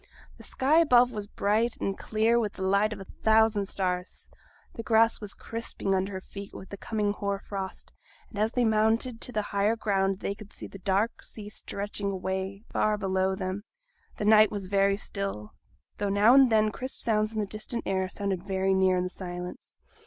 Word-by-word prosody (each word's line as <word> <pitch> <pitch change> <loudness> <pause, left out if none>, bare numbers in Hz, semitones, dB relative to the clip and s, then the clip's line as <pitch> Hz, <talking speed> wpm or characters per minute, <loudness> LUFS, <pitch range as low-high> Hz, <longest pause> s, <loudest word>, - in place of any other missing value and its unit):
The - - -13
sky 290 +5 +3
above 250 -6 +5
was 210 -3 -5
bright 220 +3 +1
and 195 - -1
clear 225 +3 +1
with 210 -3 -1
the 190 - -6
light 200 +3 +3
of 210 - -5
a - - -6 0.2
thousand 220 -2 +4
stars, 180 -2 -3 0.4
the - - -5
grass 225 0 +3
was 205 -2 -5
crisping 225 -3 -3
under 190 +1 0
their 190 - -4
feet 200 +1 -10
with 190 - -9
the 200 - -7
coming 210 -1 -1
hoar 200 -1 -2
frost; 195 -1 -6 0.4
and 210 - -6
as 215 +1 +2
they 245 -1 +1
mounted 225 +2 +1
to - - -1
the 215 -3 -1
higher 205 +2 +1
ground 195 -3 0
they 200 - -1
could 210 0 -13
see - - -8
the 195 - -10
dark 200 +4 0
sea 210 -2 -9
stretching 205 -1 -4
away 190 +1 -3
far 215 0 +2
below 190 -1 0
them. 190 +1 -4 0.5
The 210 - -2
night 215 0 +7
was 200 -2 -4
very 195 +1 +2
still, 195 - -4 0.5
though 205 - 0
now 205 +4 +5
and 265 -2 +7
then 215 -1 +4
crisp 260 +5 -6
sounds 215 -1 +1
in 220 - -7
the 210 - +1
distant 215 +3 -5
air 190 -1 0
sounded 195 -1 -2
very 190 -1 0
near 190 -1 +3
in 180 - +1
the 180 - -2
silence. 180 -1 -7
205 Hz, 195 wpm, -28 LUFS, 195-220 Hz, 0.5 s, night